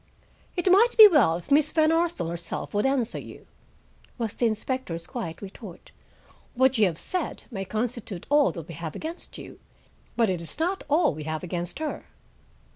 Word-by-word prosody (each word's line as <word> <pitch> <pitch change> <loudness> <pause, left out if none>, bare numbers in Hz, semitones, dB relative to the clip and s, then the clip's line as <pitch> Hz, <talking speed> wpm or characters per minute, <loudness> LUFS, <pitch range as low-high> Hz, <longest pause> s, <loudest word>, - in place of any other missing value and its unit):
"It 360 0 +2
might 460 +6 +5
be 435 -1 +12
well 275 - +4
if 175 +11 -12
Miss 300 +1 +4
Van 315 -1 +3
Arsdale 335 - 0
herself 170 0 -5
would 205 +5 +2
answer 255 -4 0
you," - - -12 0.7
was 230 -4 -3
the 240 - +1
inspector's 215 -6 -3
quiet 210 -9 -6
retort. 195 -2 -11 0.6
"What 260 -1 +3
you 210 - +5
have 165 -3 -4
said 365 - -3
may 195 -4 -4
constitute 220 -3 -4
all 290 -1 +5
that 165 -4 -8
we 170 - -8
have 160 0 -6
against 325 +2 -6
you, - - -11 0.6
but 230 -2 +3
it 180 -3 -2
is 165 - -2
not 355 +5 -1
all 310 - +3
we 150 0 -7
have 155 +1 -4
against 175 0 -4
her." 315 -1 -4
235 Hz, 180 wpm, -26 LUFS, -, 0.7 s, be